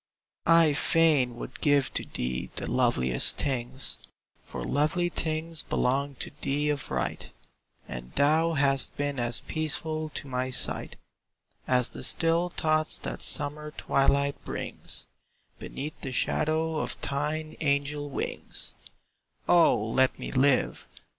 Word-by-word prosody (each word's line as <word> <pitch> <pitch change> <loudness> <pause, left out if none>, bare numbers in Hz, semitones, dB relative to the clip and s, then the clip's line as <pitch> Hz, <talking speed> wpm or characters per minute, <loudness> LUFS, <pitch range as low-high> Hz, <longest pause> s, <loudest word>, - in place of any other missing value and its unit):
I 165 -2 +6
fain 145 -5 +3
would 125 +2 -8
give 145 -3 +3
to - - 0
thee 65 0 -3
the - - -2
loveliest 65 -1 +3
things, 130 -1 -1 0.5
For - - -6
lovely 155 - +1
things 160 -1 -2
belong 140 +2 0
to - - -5
thee 145 +2 +1
of 145 -1 -4
right, 65 -2 -3 0.6
And 60 0 -7
thou 155 +4 +3
hast 140 -2 +1
been 145 -2 -1
as 120 -2 +1
peaceful 155 0 -2
to - - -4
my 130 0 -2
sight, 130 - +1 0.7
As 125 -1 +3
the - - -8
still 165 +2 +2
thoughts 155 -2 0
that - - -5
summer 150 +1 +1
twilight 140 +1 +1
brings; - - -5 0.5
Beneath 150 +3 -7
the 135 - -4
shadow 155 +5 0
of - - -3
thine 150 +2 -2
angel 145 0 0
wings 135 - -4 0.7
O 175 -2 +6
let 130 +3 +2
me - - -6
live! 135 0 +2
145 Hz, 125 wpm, -28 LUFS, 130-155 Hz, 0.7 s, I